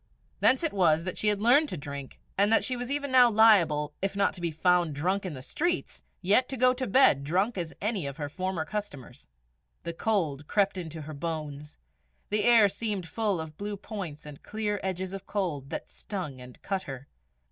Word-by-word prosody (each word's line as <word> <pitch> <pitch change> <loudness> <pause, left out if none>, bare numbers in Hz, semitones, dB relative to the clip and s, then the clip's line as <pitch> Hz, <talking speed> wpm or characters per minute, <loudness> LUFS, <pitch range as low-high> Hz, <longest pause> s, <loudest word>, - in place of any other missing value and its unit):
Thence 260 +5 +4
it 330 - 0
was 165 -5 +3
that 185 - -4
she 215 - 0
had 210 0 +2
learned 285 +6 +5
to - - -4
drink, 140 -1 -8 0.2
and 200 +2 +3
that 225 - +5
she 255 - 0
was 245 0 -5
even 285 -1 -2
now 250 -2 +7
liable, 170 -10 +4
if 195 +1 -1
not 200 0 +2
to 180 - -8
be 170 - 0
found 170 -1 +2
drunk 185 +6 -1
in 160 - -6
the 130 - -9
streets, 345 - -2 0.2
yet 210 +8 +3
to 265 - -4
go 255 +1 +4
to 255 0 -3
bed 195 - +5
drunk 190 +10 0
as 170 -4 -4
any 205 -7 -1
of 140 +1 -7
her 145 -2 -3
former 185 +1 -3
customers. 145 -12 -7 0.5
The 170 - -4
cold 160 -7 -1
crept 200 -1 +1
into 160 -2 -7
her 155 +1 -8
bones; 150 -1 -5 0.5
the 210 0 +2
air 230 -3 +7
seemed 200 -3 -3
full 210 -2 -1
of 155 -1 -7
blue 205 0 -4
points 185 -8 -7
and 150 -2 -10
clear 210 -1 -3
edges 190 0 -3
of 195 0 -8
cold, 165 -10 -3
that - - -6
stung 165 -11 -6
and 125 0 -12
cut 195 -1 -2
her. 135 +1 -8
185 Hz, 205 wpm, -28 LUFS, 155-215 Hz, 0.5 s, now